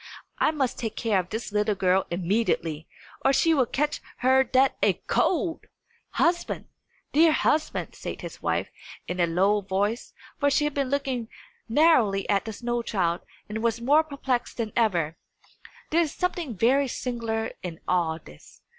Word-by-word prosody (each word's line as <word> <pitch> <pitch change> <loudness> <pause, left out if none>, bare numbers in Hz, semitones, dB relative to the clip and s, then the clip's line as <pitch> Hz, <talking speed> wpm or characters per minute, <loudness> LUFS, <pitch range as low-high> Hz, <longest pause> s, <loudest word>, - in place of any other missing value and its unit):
I - - +4
must 280 -5 -1
take 225 -3 -3
care 220 -5 +1
of 180 0 -4
this 220 0 -4
little 210 0 +1
girl 190 0 +2
immediately, 170 -4 -1 0.4
or 270 - +5
she 325 +4 +3
will 265 -5 +3
catch 295 +2 -1 0.2
her 265 +1 +6
death 260 +2 +3
a - - +4
cold!" 340 -2 0 0.5
"Husband! 345 +1 0 0.5
dear 320 +2 +6
husband!" 305 +1 0
said - - -7
his - - -8
wife, - - -1 0.4
in 180 - -4
a 170 - +3
low 195 +5 +2
voice 200 +4 -2 0.3
for 285 - +3
she 290 +2 +2
had 295 -1 0
been 275 -2 -1
looking 265 -4 -1 0.4
narrowly 230 -8 +4
at 200 +1 +2
the 220 - -5
snow 240 +2 -2
child, 180 -6 -1 0.3
and 220 +1 -4
was 230 0 0
more 290 +6 +4
perplexed 270 -5 -2
than 225 -3 -3
ever 175 -9 +1 0.7
there 335 +2 +4
is 315 -4 0
something 340 - -2
very 265 +7 +3
singular 230 -3 -3
in 170 -2 -6
all 165 -3 +1
this. 75 - -17
230 Hz, 165 wpm, -26 LUFS, 195-280 Hz, 0.7 s, her